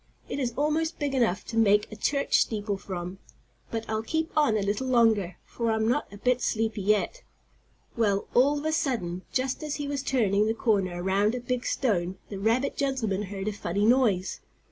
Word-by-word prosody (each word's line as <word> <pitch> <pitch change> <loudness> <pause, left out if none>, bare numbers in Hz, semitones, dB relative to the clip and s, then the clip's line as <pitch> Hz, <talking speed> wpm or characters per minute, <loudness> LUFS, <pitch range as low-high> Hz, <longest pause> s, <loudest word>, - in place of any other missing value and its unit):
"It - - -4
is 240 -3 -2
almost 310 +3 0
big 290 -2 -2
enough 230 -7 +1
to 225 - -5
make 210 -1 +4
a - - -6
church 280 +6 +2
steeple 210 -2 -1
from. 185 -1 -6 0.5
But 225 -1 -4
I'll 220 0 -1
keep 320 +7 -2
on 295 -8 +3
a 205 - 0
little 205 +6 -1
longer, 220 -8 +3
for 235 -1 -2
I'm 220 0 +1
not 245 +1 0
a 200 - -10
bit 250 +3 +1
sleepy 220 -2 -1
yet." 210 - +1 0.7
Well, 205 -4 +1
all 280 +4 +4
of 290 - -5
a 315 - +1
sudden, 240 - -1
just 255 0 -1
as 300 -1 -3
he 290 -1 -4
was 285 -1 -2
turning 215 -6 +2
the 220 - 0
corner 190 -6 0
around 200 +4 +2
a - - -2
big 245 0 -2
stone, 190 -8 0
the 200 - -6
rabbit 230 +7 +1
gentleman 250 -8 -1
heard 195 0 -5
a - - +1
funny 200 +1 -1
noise. 220 -6 +2
225 Hz, 195 wpm, -27 LUFS, 200-265 Hz, 0.7 s, make